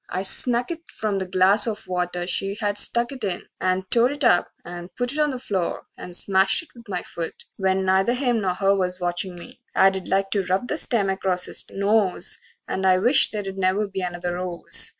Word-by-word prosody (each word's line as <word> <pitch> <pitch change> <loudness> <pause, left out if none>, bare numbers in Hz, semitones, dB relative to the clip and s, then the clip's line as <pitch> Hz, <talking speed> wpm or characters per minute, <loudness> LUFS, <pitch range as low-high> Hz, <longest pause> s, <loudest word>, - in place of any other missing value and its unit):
I 185 +1 -2
snuck 245 - +3
it 330 -1 -8
from 210 -3 -2
the 190 - -4
glass 190 +4 +3
of 215 -1 -4
water 180 -1 -2
she 195 +2 +1
Had 205 -1 -1
stuck 235 +1 +2
it 260 -4 -6
in, 185 -3 -2 0.2
and 185 0 0
tore 240 +1 +4
it 290 +1 -3
up 230 -8 +4 0.2
and 175 0 -8
put 245 0 -1
It 295 - -3
on 300 0 +3
the 260 - -3
floor 195 -8 -3
and 180 - -6
smashed 195 - +3
it 330 - -19
with 235 -3 -16
my 180 -2 -3
foot, 165 -1 -6
When 190 -1 0
neither 190 +6 +2
him 245 -4 0
nor 185 -2 -1
her 195 +1 +2
was 180 -1 -2
watchin' 175 +1 -2
me 175 - -11 0.2
I'd 190 -1 +3
like 195 0 0
to 200 -1 +1
rub 190 +7 -1
the 300 - -1
stem 220 -10 +1
acrost 190 -1 0
his - - 0
nose, 200 -1 0 0.3
And 190 - -3
I 185 -1 +4
wish 240 +9 +5
they'd 200 -3 -5
never 190 +2 +1
be 195 -1 -5
another 175 0 -3
rose. 175 -1 -2
195 Hz, 215 wpm, -23 LUFS, 185-225 Hz, 0.3 s, wish